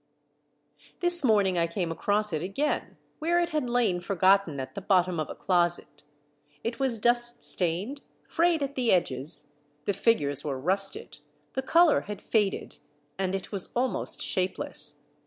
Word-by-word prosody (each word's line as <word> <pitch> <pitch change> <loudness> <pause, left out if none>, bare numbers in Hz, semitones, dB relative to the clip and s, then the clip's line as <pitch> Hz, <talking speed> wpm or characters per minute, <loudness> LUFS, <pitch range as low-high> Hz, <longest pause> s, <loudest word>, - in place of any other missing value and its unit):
This 350 -2 +5
morning 200 -7 +3
I 170 - +2
came 170 0 -3
across 205 +3 0
it 155 - -1
again, 200 - -2 0.2
where 340 +3 +1
it 345 0 -1
had 300 -5 -1
lain 225 -8 +1
forgotten 190 -4 +2
at 130 - -6
the 200 - -6
bottom 185 -3 +2
of 155 - -3
a - - -7
closet; 175 -5 0 0.6
it 235 +2 -4
was 265 -4 +1
dust 240 +2 +3
stained, 190 - 0 0.3
frayed 335 -3 +1
at 280 0 -3
the 250 -4 +1
edges, 145 -3 0 0.3
the 200 - 0
figures 145 - +1
were 140 -3 -3
rusted, 195 +7 -1 0.3
the 265 - -1
color 330 +4 +4
had 210 0 -7
faded, 210 -4 -1 0.4
and 190 0 -1
it 190 - -6
was 195 -3 -1
almost 250 +1 -1
shapeless. 185 0 -2
200 Hz, 155 wpm, -27 LUFS, 175-245 Hz, 0.6 s, This